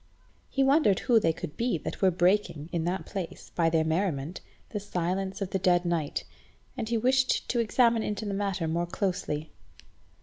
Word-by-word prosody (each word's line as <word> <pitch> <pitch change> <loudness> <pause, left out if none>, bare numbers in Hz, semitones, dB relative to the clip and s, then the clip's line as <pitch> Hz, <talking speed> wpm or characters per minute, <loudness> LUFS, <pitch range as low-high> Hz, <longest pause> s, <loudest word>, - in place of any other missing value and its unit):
He 275 - +1
wondered 270 - +4
who 235 -2 +4
they 165 - +2
could 160 -2 -7
be 235 -6 0
that - - -6
were 190 - +6
breaking 175 -3 +1
in 165 -2 -1
that 180 +2 -2
place, 190 -4 -6
by 165 -1 +2
their 160 -1 +2
merriment, 160 -1 -1 0.3
the 210 - -3
silence 190 0 -2
of 190 - -6
the 190 - 0
dead 180 -1 +3
night, 170 -4 -1 0.5
and 230 -4 -4
he 235 - +1
wished 255 +3 +2
to 240 - +1
examine 230 0 +3
into 210 0 -3
the 200 - -2
matter 195 -4 -1
more 170 +2 -1
closely. 170 -5 -2
190 Hz, 180 wpm, -28 LUFS, 170-215 Hz, 0.5 s, were